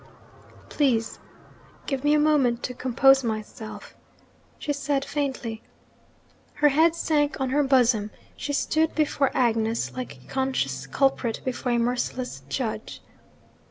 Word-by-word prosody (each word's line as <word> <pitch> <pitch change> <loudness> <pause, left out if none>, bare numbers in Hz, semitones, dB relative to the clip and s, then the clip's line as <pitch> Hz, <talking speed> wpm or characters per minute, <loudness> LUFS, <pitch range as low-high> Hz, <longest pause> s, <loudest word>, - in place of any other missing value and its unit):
'Please 235 -6 0 0.7
give 270 -2 -3
me 295 +1 +4
a - - +3
moment 280 -6 +2
to 250 - -3
compose 265 +2 +4
myself,' 215 -1 -6 0.6
she 290 - -2
said 280 -1 -1
faintly. 260 -6 -3 0.9
Her 295 0 +4
head 320 +4 +4
sank 295 -3 0
on 260 -1 -1
her 295 +2 +3
bosom: 245 -6 +3 0.3
she 290 - -4
stood 315 +2 +1
before 290 -3 +1
Agnes 230 -2 +1
like 255 -1 -6
a - - -20
conscious 135 - -2
culprit 260 - +1
before 250 -1 -1
a - - +2
merciless 245 - -2
judge. 220 - -4
260 Hz, 125 wpm, -25 LUFS, 235-285 Hz, 0.9 s, me